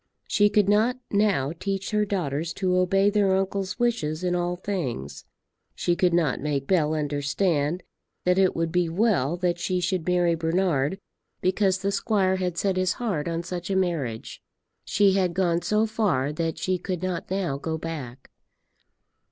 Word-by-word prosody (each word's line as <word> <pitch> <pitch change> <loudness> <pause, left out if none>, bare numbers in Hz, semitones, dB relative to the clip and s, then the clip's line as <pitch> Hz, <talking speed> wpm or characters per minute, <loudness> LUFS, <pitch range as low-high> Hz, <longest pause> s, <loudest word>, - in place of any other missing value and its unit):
She 205 0 +3
could 205 -1 +3
not 220 +5 +3
now 200 -10 +2
teach 195 0 -3
her 210 -1 +2
daughters 165 -5 -2
to 185 -2 0
obey 195 +2 +3
their 200 -2 +3
uncle's 195 0 -2
wishes 185 -10 -1
in 180 -1 +1
all 175 0 0
things. 130 - -4 0.5
She 175 - 0
could 180 0 +2
not 165 -6 +1
make 140 -2 -1
Bell 155 -2 +2
understand 150 +3 0 0.4
that 180 +1 +3
it 190 -1 +3
would 165 -1 -1
be 175 -1 +1
well 175 - +1
that 175 -1 0
she 180 +1 -1
should 180 -1 -1
marry 175 -1 +3
Bernard 165 -1 0 0.4
because 190 0 +2
the 200 - +1
squire 195 -2 +1
had 180 -2 -2
set 190 +1 0
his 185 0 +2
heart 195 -12 -2
on 165 0 -2
such 175 +1 -5
a 195 - 0
marriage. 160 -12 -2 0.4
She 200 -1 +3
had 185 -3 +1
gone 175 -2 +1
so 210 +5 +2
far 190 - 0
that 165 0 -2
she 185 -1 -1
could 180 -1 -4
not 185 -2 -3
now 180 -8 -1
go 160 +2 -3
back. 140 -6 -7
180 Hz, 170 wpm, -25 LUFS, 160-195 Hz, 0.5 s, She